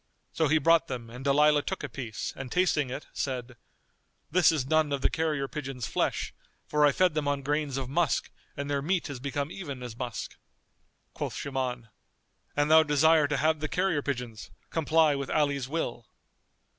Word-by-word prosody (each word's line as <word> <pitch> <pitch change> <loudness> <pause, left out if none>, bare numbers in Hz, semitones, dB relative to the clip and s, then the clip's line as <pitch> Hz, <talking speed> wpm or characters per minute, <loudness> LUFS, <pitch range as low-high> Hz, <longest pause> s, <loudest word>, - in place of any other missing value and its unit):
So 160 - +2
he 155 +3 +4
brought 165 +2 +4
them 120 -3 -6
and 125 +2 -8
Dalilah 150 +2 +4
took 190 - -4
a - - -2
piece 115 -6 -5
and 130 -2 -7
tasting 180 -7 +2
it, 130 +4 -5
said, 125 -2 -3 0.8
"This 180 +1 +5
is 150 -5 -1
none 155 +1 +2
of 140 -1 -1
the - - +2
carrier 155 -4 0
pigeons' 135 -5 -5
flesh, - - -1 0.3
for 150 0 +3
I - - +4
fed 185 +2 +2
them 150 -2 -1
on 140 -1 0
grains 145 -1 -1
of 135 -2 -3
musk 155 +3 0 0.3
and 140 0 -3
their 140 -1 0
meat 170 0 -1
is 135 - -6
become 140 +3 -3
even 140 -10 -6
as 120 -2 -7
musk." 120 -3 -5 0.8
Quoth - - -4
Shuman, 125 -4 -3 0.7
"An 145 0 +3
thou 160 0 +8
desire 155 0 +4
to 145 -1 -1
have 155 +1 +2
the 155 - -2
carrier 180 -2 0
pigeons, 120 -7 -5 0.2
comply 160 -1 +3
with 140 -1 -3
Ali's 140 -4 0
will." 125 -7 -3
145 Hz, 180 wpm, -28 LUFS, 130-155 Hz, 0.8 s, thou